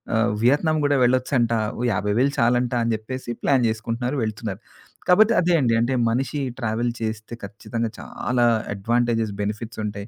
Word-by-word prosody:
ఆహ్, 115 +1 +2
వియత్నం 155 +5 +3
గూడా 145 0 +3
వెళ్ళొచ్చంటా. 125 -2 +2 0.2
ఓ - - -2
50,000 105 +8 +1
చాలంట 120 +1 +2
అని 115 - 0
జెప్పేసి, 120 +3 -6
ప్లాన్ 130 -4 +3
చేసుకుంటున్నారు, 115 +4 -3
వెళ్తున్నారు. 110 -1 -4 0.5
కాబోతే 215 +5 +5
అదే 175 0 +2
అండి. 120 -5 +2
అంటే 120 +3 +1 0.2
మనిషి 135 +5 -1 0.2
ట్రావెల్ 115 0 -1
చేస్తే 110 +1 -4
ఖచ్చితంగా 115 +3 -4
చాలా 120 -1 -2 0.3
అడ్వాంటేజెస్ 115 +1 0
బెనిఫిట్స్ 110 +2 -4
ఉంటాయి. 100 0 -5
120 Hz, 145 wpm, -23 LUFS, 110-130 Hz, 0.5 s, కాబోతే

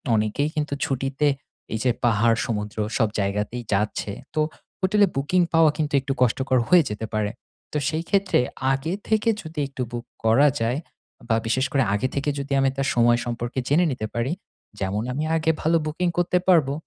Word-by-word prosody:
অনেকেই 110 +8 0
কিন্তু 150 -1 -1
ছুটিতে 135 +2 0 0.5
এই 110 - -1
যে 125 - +3
পাহাড়, 115 0 +3
সমুদ্র 105 -2 -3 0.2
সব 115 - +3
জায়গাতেই 105 +5 -2
যাচ্ছে। 105 +1 -1 0.2
তো 155 - +2 0.4
হোটেলে 200 +2 +4
বুকিং 145 +7 +2
পাওয়া 165 -2 +6
কিন্তু 150 -2 -1
একটু 135 +1 -2
কষ্টকর 130 +1 +2
হয়ে 180 -2 +7
যেতে 105 +1 -4
পারে। 105 -1 0 0.4
তো - - -1
সেই 160 +2 -2
ক্ষেত্রে 200 -1 +3 0.3
আগে 135 +6 -1
থেকে 220 +1 +2
যদি 160 -3 -7
একটু 135 -1 -7
বুক 120 0 -5 0.2
করা 120 +7 +5
যায় 120 +5 0 0.5
বা 115 - +4
বিশেষ 130 +4 +1
করে 135 -2 +3
আগে 105 +5 +1
থেকে 140 +1 0
যদি 140 0 -6
আমি 135 0 +3
তার 135 0 0
সময় 120 0 +4
সম্পর্কে 120 +1 -3
জেনে 160 +6 +4
নিতে 110 -4 -3
পারি, 120 +5 -1 0.5
যেমন 100 +2 -1
আমি 150 +4 -2
আগে 160 0 +2
ভালো 165 +2 +3
বুকিং 165 +4 -1
করতে 175 +1 +2
পারবো। 160 -7 +4
135 Hz, 180 wpm, -24 LUFS, 115-155 Hz, 0.5 s, হয়ে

